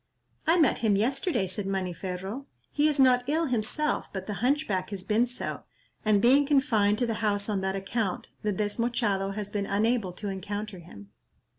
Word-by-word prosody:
"I 335 +2 +5
met 310 - +3
him 215 -3 +2
yesterday," 255 - +1
said 190 +2 -3
Maniferro. 190 +5 -4 0.2
"He 295 +1 +3
is 300 -2 0
not 250 -2 +5
ill 320 +3 +1
himself, 255 +4 -1
but 190 -1 -5
the 210 - -4
Hunchback 250 -8 +1
has 195 -2 -5
been 225 +4 +2
so, 245 - -5 0.4
and 215 -2 +4
being 275 +4 +5
confined 225 -8 +3
to 245 - +1
the 230 - -1
house 205 -2 0
on 205 -3 -1
that 190 0 -1
account, 195 0 -2
the 210 - 0
Desmochado 205 -1 0
has 205 -1 -4
been 205 -1 -2
unable 215 -1 +1
to 205 +3 -6
encounter 205 +1 -5
him." 100 - -13
210 Hz, 175 wpm, -28 LUFS, 195-250 Hz, 0.4 s, I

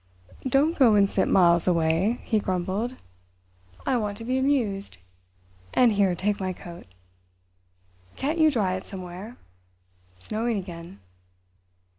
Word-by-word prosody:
"Don't 295 +6 +2
go 235 -6 +6
and 200 -1 +5
sit 195 - 0
miles 170 -2 +4
away," 170 +6 +1
he 220 - +1
grumbled. 195 +6 -2 0.9
"I 255 - +2
want 205 -3 -3
to 230 - -8
be 255 +3 0
amused. 230 - 0 0.8
And 245 -2 +5
here, 200 -3 +2
take 205 +3 -1
my 185 -1 -2
coat. 175 - -11 1.3
Can't 305 +5 -2
you 315 -1 +6
dry 210 -10 0
it 185 - -5
somewhere?—snowing 95 - -7
again." 170 - -8
195 Hz, 120 wpm, -25 LUFS, 175-235 Hz, 1.3 s, go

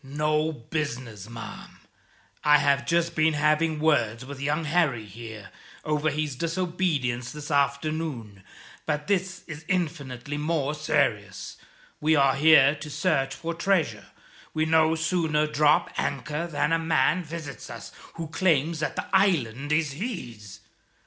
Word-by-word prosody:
"No 150 +3 0
business, 120 -7 -5
ma'am. 115 -1 -9 0.7
I 150 0 +7
have 140 -1 +2
just 170 0 +1
been 155 -1 +3
having 155 +1 +2
words 125 -7 +1
with 140 0 -8
young 150 +3 0
Harry, 150 -8 +1
here, 110 0 -10 0.3
over 150 0 +1
his 150 -2 -2
disobedience 165 -7 -1
this 150 0 -7
afternoon; 140 -6 -1 0.5
but 150 -1 -1
this 185 -2 -1
is 155 -2 -8
infinitely 145 -6 -2
more 150 -1 0
serious. 155 0 -1 0.4
We 155 +1 +3
are 140 -2 +4
here 140 -1 +6
to 150 0 -8
search 135 -5 0
for 170 +3 -4
treasure. 165 - 0 0.5
We 155 0 +2
no 160 0 +4
sooner 160 -2 +1
drop 150 0 +3
anchor 150 +4 -2
than 150 -1 0
a 165 - +3
man 165 +2 +2
visits 155 -3 -7
us, - - -8 0.2
who 165 -1 -5
claims 160 -2 +1
that 150 - -2
the - - -3
island 145 - +2
is 155 -2 +2
his. 120 - -6
150 Hz, 135 wpm, -26 LUFS, 135-165 Hz, 0.7 s, I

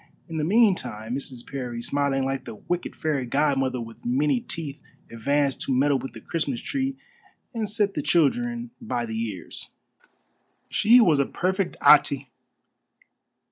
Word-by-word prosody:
In 165 -2 -5
the 155 - 0
meantime 155 - +2
Mrs. 130 -2 -5
Parry, 125 -4 -5
smiling 135 +1 0
like 135 0 -2
the - - -7
wicked 175 +10 -4
fairy 150 -4 -1
godmother 135 -2 +1
with 115 -1 -9
many 135 +2 +2
teeth, 145 0 -6 0.3
advanced 140 +4 0
to - - -2
meddle 135 +1 +3
with 135 - -7
the - - -9
Christmas 145 -7 -2
tree 270 -1 -2 0.6
and 220 -3 -2
set 205 -1 +1
the 150 - -2
children 235 - +1
by 125 - -2
the 110 -1 -5
ears. 95 -5 -7 1.0
She 235 +4 +6
was 165 - +5
a 140 - +2
perfect 190 +1 -1
Atê. - - +5
145 Hz, 145 wpm, -25 LUFS, 130-185 Hz, 1.0 s, She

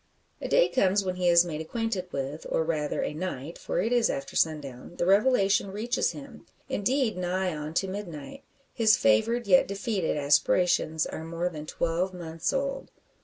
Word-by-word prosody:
A - - -3
day - - +4
comes 200 -4 +2
when 185 -1 -2
he 180 -1 0
is 170 0 +6
made 160 -2 -4
acquainted 195 0 -3
with 135 - -2
it, 145 +4 -8
or, 160 - +1
rather, 155 -2 -1
a - - -3
night; 160 -2 -5
for - - -2
it 225 +7 0
is 240 -2 +3
after 135 0 -4
sundown 150 -1 -2
the 175 - -1
revelation 200 -1 +3
reaches 220 +5 0
him 275 -5 -11 0.2
indeed, 250 +2 0
nigh 180 -1 -1
on 150 +1 -6
to 195 - +1
midnight. 185 - -7 0.3
His 220 -3 +4
favoured, 170 - +2
yet 185 -3 +5
defeated, 200 -4 -2
aspirations, 155 +2 +2
are 160 - -6
more 170 +2 -2
than 155 -3 -8
twelve 170 +4 -1
months 165 -1 -3
old. 275 0 -3
180 Hz, 175 wpm, -27 LUFS, 160-210 Hz, 0.3 s, is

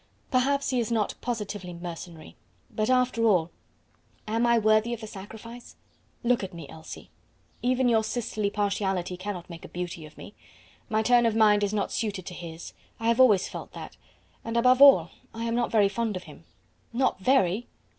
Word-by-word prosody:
"Perhaps 275 +1 +1
he 255 - +1
is 235 0 -2
not 220 -3 0
positively 205 -6 -4
mercenary; 170 - -9 0.4
but 215 +2 -1
after 250 -2 +2
all 175 -6 +3 0.8
am 225 +2 +1
I 235 0 +4
worthy 215 +2 +3
of 230 - -13
the - - -6
sacrifice? 220 +4 -10 0.5
Look 240 -2 +2
at 190 -2 -6
me, 165 -4 -8
Elsie; 160 +2 -11 0.5
even 255 +1 +2
your 225 -2 +3
sisterly 215 -2 -2
partiality 195 -3 -1
cannot 185 -1 -6
make 170 -2 -10
a - - -8
beauty 175 -3 -6
of 150 - -19
me. - - -11 0.6
My 220 -1 +1
turn 240 0 +4
of 225 - 0
mind 210 -2 +4
is 200 - 0
not 210 -2 -1
suited 205 -5 -3
to 180 - -7
his; 170 -1 -8 0.3
I 225 0 0
have 235 +2 +2
always 215 -8 +5
felt - - -8
that; - - -9 0.5
and, 230 +1 -3
above 250 +2 +4
all, 185 - +8 0.2
I 230 - -4
am 230 0 -1
not 240 0 0
very 210 -3 +4
fond 220 -1 -2
of 180 - -8
him." - - -14 0.5
"Not 250 -3 0
very!" 220 -1 +2
215 Hz, 185 wpm, -27 LUFS, 185-235 Hz, 0.8 s, all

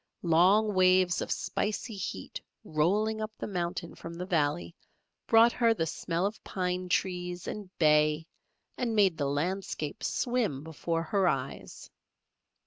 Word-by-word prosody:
Long 190 +6 +4
waves 185 -1 +4
of - - -4
spicy 215 +2 -2
heat 170 - -5 0.2
rolling 210 +8 +1
up 215 - -2
the - - -4
mountain 175 -3 -3
from 165 0 -9
the 180 +1 -5
valley 145 - 0 0.5
brought 230 +1 +6
her 230 -2 +2
the 165 - 0
smell 170 +2 -2
of 210 +2 -4
pine 180 -1 -2
trees 180 -1 -1
and 205 -3 -6
bay 150 0 +3 0.5
and 235 -3 -1
made 195 -5 +4
the 140 -1 0
landscape 160 0 -3
swim 235 - -1
before 165 +1 -2
her 190 +3 +1
eyes. - - -4
180 Hz, 135 wpm, -29 LUFS, 160-205 Hz, 0.5 s, brought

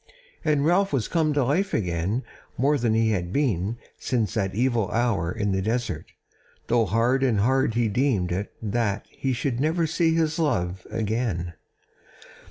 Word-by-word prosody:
And 150 -3 +2
Ralph 190 +4 +3
was 135 -6 0
come 160 -3 +1
to 145 -2 +2
life 175 +10 +1
again 95 +5 -1 0.3
more 140 +4 +3
than 115 -2 +1
he 110 0 +3
had 90 -4 -2
been 115 - 0 0.2
since 115 -7 -1
that 95 -3 -1
evil 120 -3 +1
hour 110 -8 0
in 105 +1 -1
the 95 0 0
desert; 110 -6 -2 0.6
though 115 -1 +2
hard 115 +7 +2
and 120 -7 +2
hard 130 +1 +2
he 120 -1 +2
deemed 105 -5 +1
it 95 +4 -2
that 105 -1 -1
he 135 - -2
should 125 0 -1
never 160 +4 +1
see 160 +1 +1
his 160 -1 +1
love 95 - -1
again. 110 -6 -2
115 Hz, 165 wpm, -25 LUFS, 100-140 Hz, 0.6 s, Ralph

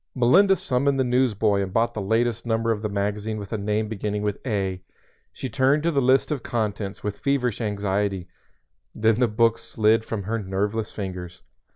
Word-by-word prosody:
Melinda 180 +11 +5
summoned 135 -2 0
the - - +4
newsboy 115 -5 +2
and 95 -1 -3
bought 115 +4 +1
the 105 - -3
latest 115 +3 0
number 115 0 0
of 105 -2 -1
the 105 - -2
magazine 105 +2 -2
with 100 +1 -7
a - - 0
name 105 +2 -1
beginning 105 -1 -3
with 105 -1 -2
"A." 95 -4 -1 0.5
She - - -5
turned 135 +3 +2
to 170 - +2
the 140 -3 +1
list 130 +4 +3
of 145 -4 -1
"Contents" 105 -4 -3
with 105 -1 -4
feverish 125 -5 0
anxiety, 100 -3 -1 0.7
then 110 +1 +2
the 125 - +4
book 115 +1 +2
slid 110 +1 +2
from 110 -3 -4
her 115 +4 -2
nerveless 105 +3 -2
fingers. 90 -3 -6
110 Hz, 185 wpm, -24 LUFS, 100-120 Hz, 0.7 s, Melinda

